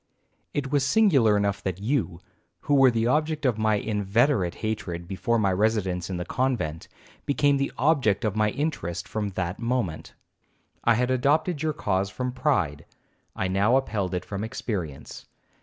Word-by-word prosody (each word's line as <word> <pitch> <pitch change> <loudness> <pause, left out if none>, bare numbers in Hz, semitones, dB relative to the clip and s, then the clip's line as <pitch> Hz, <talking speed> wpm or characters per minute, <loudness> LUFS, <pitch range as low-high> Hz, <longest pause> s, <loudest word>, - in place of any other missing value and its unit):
'It 135 -2 -2
was 145 -2 +2
singular 140 - +4
enough 100 -1 0
that 95 -1 -3
you, 105 -6 -1 0.4
who 145 - -1
were 135 -2 +7
the 115 -1 0
object 150 +3 0
of 120 -4 +1
my 110 0 +2
inveterate 105 - +1
hatred 90 -6 -4
before 95 +5 0
my 100 -4 +2
residence 95 -4 0
in 90 - -3
the 90 - -4
convent, 120 -13 -2 0.4
became 140 0 +3
the 140 0 -1
object 130 -7 +2
of 105 -1 -1
my 105 0 +2
interest 115 - -3
from 105 -2 -2
that 90 -1 -3
moment. 115 -9 -2 0.7
I 115 - +4
had 125 +2 +1
adopted 145 +5 +1
your 155 -1 0
cause 95 -5 -1
from 125 +6 -3
pride, 120 - -1 0.5
I 95 - -1
now 100 +6 +2
upheld 100 -9 -1
it 90 - -3
from 100 0 -4
experience. 95 - -5
110 Hz, 160 wpm, -26 LUFS, 95-135 Hz, 0.7 s, were